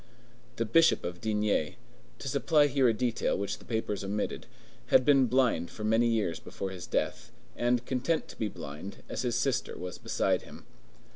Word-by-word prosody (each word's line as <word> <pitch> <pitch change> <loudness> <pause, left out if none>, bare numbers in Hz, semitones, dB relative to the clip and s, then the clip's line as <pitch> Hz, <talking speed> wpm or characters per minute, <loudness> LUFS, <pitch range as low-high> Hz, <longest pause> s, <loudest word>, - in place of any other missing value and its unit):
The 115 - -1
Bishop 165 +8 +4
of 85 0 -5
D—— 105 -7 0 0.4
to - - -7
supply 145 +3 +3
here 135 -3 +3
a - - +5
detail 120 +1 0
which 100 - -3
the - - -16
papers 110 -3 -2
omitted—had 105 - -1
been 135 -3 +5
blind 120 -9 +2
for 105 - -8
many 115 +2 +3
years 110 -8 0
before 95 -1 -6
his 90 -2 -7
death, - - -2 0.2
and 120 0 +1
content 130 +6 0
to - - -10
be 110 - -1
blind, 80 +1 -8
as - - -3
his 120 -2 -1
sister 130 +1 0
was 90 0 -6
beside - - 0
him. - - -13
115 Hz, 170 wpm, -30 LUFS, 100-130 Hz, 0.4 s, a